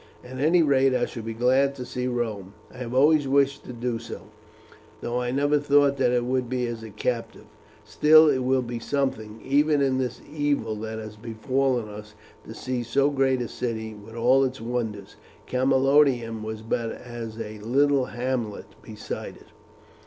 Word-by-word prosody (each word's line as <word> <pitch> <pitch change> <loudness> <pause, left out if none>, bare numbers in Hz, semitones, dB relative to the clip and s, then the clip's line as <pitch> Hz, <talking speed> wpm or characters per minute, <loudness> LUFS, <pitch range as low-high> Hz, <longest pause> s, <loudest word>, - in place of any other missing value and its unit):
At 130 +1 -9
any 165 +4 +4
rate 135 -3 +3
I 120 - +1
shall 115 - -7
be 115 0 -6
glad 130 +4 +2
to 125 - -6
see 125 0 -3
Rome. 110 -6 -3 0.2
I - - -13
have 120 -2 -5
always 145 +1 +4
wished 140 0 +2
to - - -7
do 120 -1 -3
so, 115 - -9 0.7
though 120 +1 -2
I 125 - -2
never 145 +3 +2
thought 145 -1 +3
that 130 -2 +3
it 120 -1 +1
would 125 -1 -1
be 125 -1 -1
as 120 -1 -5
a 110 - -8
captive. 115 +3 -4 0.4
Still, 155 +1 +6
it 140 -3 +3
will 130 0 +1
be 120 -1 -5
something 115 -5 -2
even 145 +2 +3
in 135 -2 +1
this 125 -2 -3
evil 145 -7 -1
that 110 +1 -5
has 110 -1 -8
befallen 120 +2 -1
us 105 0 -10 0.3
to - - -8
see 125 -1 -3
so 140 +4 +1
great 135 -2 +1
a - - -4
city 110 -2 -4
with 105 +2 -13
all 125 +3 +4
its 130 0 -2
wonders. 115 -3 -4 0.3
Camalodunum 130 -3 +2
was 110 0 -6
but 115 0 -2
as 115 -2 -8
a 110 -1 -6
little 135 +4 +2
hamlet 120 -4 -3 0.2
beside - - -7
it." - - -19
125 Hz, 180 wpm, -25 LUFS, 115-135 Hz, 0.7 s, Still